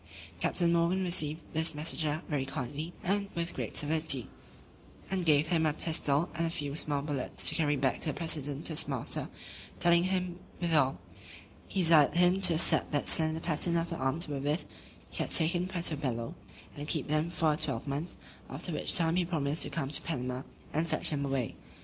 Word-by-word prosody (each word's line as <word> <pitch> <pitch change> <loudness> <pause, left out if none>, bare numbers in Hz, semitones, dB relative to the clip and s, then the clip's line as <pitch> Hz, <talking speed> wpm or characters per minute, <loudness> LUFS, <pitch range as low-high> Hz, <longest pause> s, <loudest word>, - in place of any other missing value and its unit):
Captain 170 -2 +1
Morgan 170 +3 +1
received 160 -3 +1
this 160 0 +1
messenger 155 0 -1
very 145 -4 -1
kindly, 140 +4 -5
and 200 +2 -1
with 170 0 -3
great - - -5
civility; 150 -4 +2 0.8
and 185 -3 -1
gave 150 0 +4
him 165 -2 +2
a 155 -2 +1
pistol, 155 0 +1
and 165 0 -1
a - - -2
few 145 -3 -3
small 145 -2 -1
bullets, 145 -3 -1
to - - +5
carry 150 -3 +1
back 135 -2 0
to - - -2
the 150 - 0
president 145 -3 -1
his 155 -2 +1
master; - - -1 0.5
telling 170 0 +4
him, 185 -1 -2 0.2
withal, 155 -6 +2 0.7
"he 195 - -1
desired 160 -3 +5
him 180 +2 +3
to 175 -3 +5
accept 160 - +3
that 145 - -1
slender 160 0 +1
pattern 170 +1 0
of 170 +1 -2
the - - -2
arms 155 +4 -1
wherewith 145 +3 -2 0.5
he - - -8
had - - -2
taken 175 +2 +3
Puerto 175 -4 0
Bello, 120 -5 -3 0.4
and 145 +1 -7
keep 155 -2 -1
them 155 +2 0
for 160 -2 +1
a - - -1
twelvemonth; 145 +2 -3 0.3
after - - -3
which - - +3
time 165 0 +1
he 180 - +2
promised 155 -3 -1
to - - +3
come 140 -5 -3
to 150 - +4
Panama, 125 -5 -4 0.3
and 160 +2 0
fetch 155 0 +1
them 145 -2 -1
away." 135 -4 -2
160 Hz, 185 wpm, -30 LUFS, 145-170 Hz, 0.8 s, to